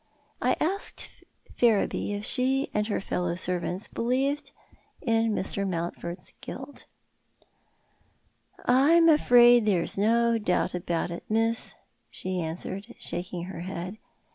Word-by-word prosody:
I - - +3
asked 390 +6 -3 0.3
Ferriby 220 -3 +2
if 205 +1 -4
she 265 +2 +1
and 210 0 0
her 210 - -1
fellow 180 -2 -2
servants 180 +2 -2
believed 265 +5 -1 0.5
in 225 -1 +1
Mr. 200 -1 -1
Mountford's 170 0 -5
guilt. 285 - -8 1.8
"I'm 300 +7 +5
afraid 240 -6 +6
there's 185 -1 +1
no 230 +2 +3
doubt 180 -3 0
about 175 -1 -2
it, 170 - -6
miss," 225 +1 0 0.3
she 185 -1 -3
answered, 190 +7 -6
shaking 175 -1 -4
her 180 -1 -7
head. 185 +3 -6
210 Hz, 115 wpm, -27 LUFS, 180-240 Hz, 1.8 s, afraid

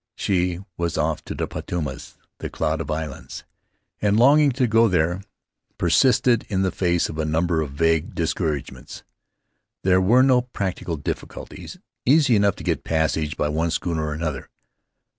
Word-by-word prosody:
She 90 -2 0 0.2
was 85 -2 -2
off - - -1
to - - -5
the - - -2
Paumotus, 75 -6 -5 0.2
the - - -5
Cloud 80 +1 -1
of 75 - -6
Islands, 75 -2 -5 0.6
and 105 -1 +2
a - - +3
longing 145 +3 +6
to 130 0 +1
go 115 0 +4
there 90 -1 +1 0.6
persisted 120 - +3
in 95 -1 0
the 95 - +1
face 85 -1 +1
of 80 - -7
a - - +1
number 80 +1 0
of 70 -3 -5
vague 80 +1 +1
discouragements. 75 -4 -3 0.8
There 95 0 +4
were 120 +7 +5
no 130 -2 +4
practical 95 -8 -4
difficulties. 70 - -7 0.3
Easy 140 -2 +4
enough 100 -2 +3
to - - -10
get - - -1
passage 80 -1 -1
by 75 - 0
one 80 +3 0
schooner 80 -1 -2
or 75 - -3
another. 75 -4 -4
85 Hz, 160 wpm, -23 LUFS, 80-105 Hz, 0.8 s, longing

